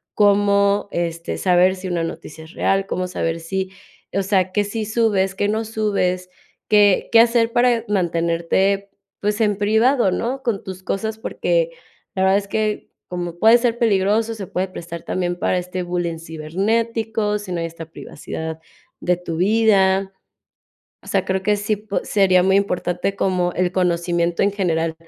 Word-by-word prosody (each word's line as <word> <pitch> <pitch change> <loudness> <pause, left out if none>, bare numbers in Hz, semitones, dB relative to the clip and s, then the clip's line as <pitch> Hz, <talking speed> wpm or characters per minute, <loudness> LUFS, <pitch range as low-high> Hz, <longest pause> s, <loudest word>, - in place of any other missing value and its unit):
cómo, 200 0 +3
este, 170 -1 -3
saber 185 0 +3
si 185 0 -7
una 170 -2 -1
noticia 160 -1 -7
es 160 - -15
real, 195 0 +1
cómo 185 0 -2
saber 165 -2 -2
si, 190 +3 -3 0.4
o 195 0 0
sea, 190 -1 +1
qué 205 +2 +1
sí 215 +1 -4
subes, 205 -4 +1
qué 205 - 0
no 220 +2 0
subes, 200 -5 -1 0.4
qué 205 -2 +4
qué 230 - +7
hacer, 230 0 +5
eh, - - -16
para 240 -1 +2
mantenerte, 180 +1 0 0.3
pues, 210 +2 0
en 205 -2 +2
privado, 220 +2 +3
¿no? 255 +7 -2
Con 230 -6 -2
tus 190 -1 -8
cosas, 220 +3 -3
porque - - 0 0.5
la 190 - +1
verdad 190 +1 +4
es 200 - -9
que 215 0 -2 0.2
como 175 -1 -4
puede 225 +5 +6
ser 235 -1 0
peligroso, 220 0 +2
se 200 -4 -7
puede 185 +1 -2
prestar 170 -2 -8
también 175 -1 -2
para 180 - +1
este 180 0 -4
bullying 175 -2 -2
cibernético, 210 +7 -1
si 205 -3 -8
no 175 - -2
hay 165 - -2
esta 165 0 -9
privacidad 160 0 -7 0.4
de 180 0 +1
tu 165 -2 -5
vida. 195 -1 +3 0.9
O - - -19
sea, 195 -1 +1
creo 190 0 -1
que 210 +1 +2
sí 205 +1 -1
po 210 0 -3
sería 185 -3 +3
muy 190 0 +3
importante 180 0 -1
como 180 -2 0
el 180 0 0
conocimiento 175 -1 0
en 200 - +1
general. 165 -5 0
195 Hz, 170 wpm, -21 LUFS, 175-210 Hz, 0.9 s, qué